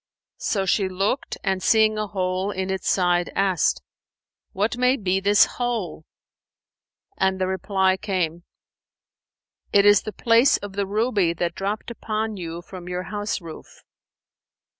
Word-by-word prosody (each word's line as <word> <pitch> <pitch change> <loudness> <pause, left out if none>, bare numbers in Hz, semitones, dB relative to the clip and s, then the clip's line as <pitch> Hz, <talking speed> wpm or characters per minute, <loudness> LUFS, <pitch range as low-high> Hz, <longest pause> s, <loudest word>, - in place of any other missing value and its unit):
So 200 - -1
she 190 +1 +1
looked 195 +8 -2
and 190 -2 0
seeing 215 0 +3
a 215 - -2
hole 185 0 -2
in 190 -1 -3
its 190 -1 -2
side 175 -2 +1
asked, 190 -4 +1 0.7
"What 210 +5 -1
may 250 +2 +2
be 190 -3 0
this 205 +2 +5
hole?"; 225 -10 -4 1.1
and 190 0 +1
the 185 - +1
reply 190 0 +1
came, 175 -4 -2 1.3
"It 200 0 +5
is 205 0 +6
the 215 - -6
place 230 +5 +4
of 205 -1 -8
the 200 0 -2
ruby 205 -4 +1
that 170 0 -2
dropped 205 +5 -4
upon 220 -1 -3
you 170 -2 -6
from 180 -1 -10
your 180 0 -3
house 205 -1 -2
roof." 165 -2 -12
195 Hz, 140 wpm, -23 LUFS, 185-215 Hz, 1.3 s, is